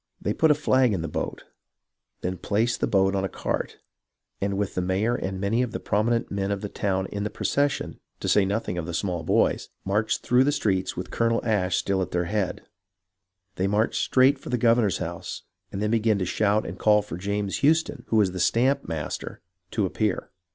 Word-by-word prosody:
They -, -, -1 dB
put 160 Hz, -, +3 dB
a 150 Hz, -, +6 dB
flag 130 Hz, -5 st, +3 dB
in 85 Hz, -4 st, -2 dB
the -, -, -2 dB
boat, 75 Hz, -, -4 dB, 0.8 s
then 90 Hz, 0 st, -3 dB
placed 115 Hz, +3 st, 0 dB
the -, -, +2 dB
boat 95 Hz, -2 st, +3 dB
on 95 Hz, -1 st, 0 dB
a 95 Hz, -, -1 dB
cart, -, -, -3 dB, 0.6 s
and 100 Hz, 0 st, 0 dB
with 100 Hz, -1 st, -1 dB
the 90 Hz, -, -1 dB
mayor 95 Hz, +6 st, +1 dB
and 95 Hz, -5 st, -3 dB
many 105 Hz, +5 st, +1 dB
of 125 Hz, -3 st, -2 dB
the -, -, -3 dB
prominent 115 Hz, +3 st, 0 dB
men 100 Hz, 0 st, -1 dB
of 100 Hz, -1 st, -2 dB
the 105 Hz, -, -4 dB
town 95 Hz, -2 st, -1 dB
in 100 Hz, 0 st, -3 dB
the 105 Hz, -, -1 dB
procession, 140 Hz, +4 st, -1 dB, 0.2 s
to -, -, -4 dB
say 105 Hz, -, +4 dB
nothing 95 Hz, -2 st, -1 dB
of 80 Hz, -, -5 dB
the 85 Hz, -, -3 dB
small 90 Hz, -2 st, -1 dB
boys, -, -, +1 dB, 0.2 s
marched 105 Hz, +3 st, 0 dB
through 125 Hz, +1 st, +4 dB
the 145 Hz, -, +2 dB
streets 95 Hz, -9 st, 0 dB
with -, -, -5 dB
Colonel 115 Hz, 0 st, +1 dB
Ashe 95 Hz, -5 st, +1 dB
still 95 Hz, -1 st, 0 dB
at 90 Hz, -, -2 dB
their 90 Hz, -1 st, -1 dB
head. 100 Hz, 0 st, -2 dB, 0.9 s
They 95 Hz, -, +1 dB
marched 105 Hz, +3 st, +1 dB
straight 135 Hz, +1 st, +4 dB
for -, -, -9 dB
the 125 Hz, -, +1 dB
governor's 115 Hz, -4 st, +3 dB
house 85 Hz, +1 st, -5 dB, 0.3 s
and 100 Hz, -, -3 dB
then 105 Hz, -, 0 dB
began 110 Hz, -2 st, +2 dB
to 95 Hz, -, -1 dB
shout 105 Hz, +3 st, +1 dB
and -, -, -7 dB
call 105 Hz, -1 st, +4 dB
for 100 Hz, -, -7 dB
James 100 Hz, +2 st, -2 dB
Houston, 150 Hz, -3 st, +2 dB
who -, -, 0 dB
was 105 Hz, -4 st, +4 dB
the 90 Hz, -, -5 dB
stamp 130 Hz, +9 st, +2 dB
master, 80 Hz, -2 st, -4 dB, 0.3 s
to 105 Hz, 0 st, 0 dB
appear. 105 Hz, +1 st, -1 dB
105 Hz, 210 wpm, -25 LUFS, 95-115 Hz, 0.9 s, a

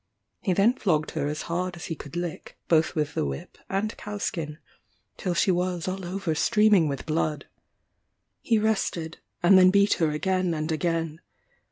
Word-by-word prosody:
He 185 Hz, -, +1 dB
then 200 Hz, +6 st, +4 dB
flogged 160 Hz, -, 0 dB
her 145 Hz, -3 st, -2 dB
as 150 Hz, +1 st, -3 dB
hard 180 Hz, +1 st, -2 dB
as 170 Hz, -, -8 dB
he -, -, -3 dB
could 150 Hz, 0 st, -10 dB
lick, 175 Hz, -2 st, -5 dB
both 160 Hz, -1 st, +3 dB
with 150 Hz, -2 st, -1 dB
the -, -, 0 dB
whip 70 Hz, -1 st, -6 dB
and 205 Hz, +3 st, -1 dB
cow 210 Hz, 0 st, -6 dB
skin, 155 Hz, -6 st, -3 dB, 0.6 s
till 180 Hz, -3 st, -2 dB
she 185 Hz, -, +3 dB
was 180 Hz, -1 st, -1 dB
all 190 Hz, +1 st, -3 dB
over 180 Hz, -1 st, -2 dB
streaming 210 Hz, +1 st, +4 dB
with 140 Hz, -2 st, -4 dB
blood. 155 Hz, -1 st, -1 dB, 1.0 s
He 230 Hz, -, +2 dB
rested, 195 Hz, -7 st, -1 dB, 0.2 s
and 185 Hz, +2 st, +7 dB
then 185 Hz, 0 st, +7 dB
beat 200 Hz, +2 st, +4 dB
her 160 Hz, -, +4 dB
again 185 Hz, +3 st, 0 dB
and 155 Hz, +1 st, -2 dB
again. 165 Hz, 0 st, -1 dB
175 Hz, 175 wpm, -26 LUFS, 155-190 Hz, 1.0 s, and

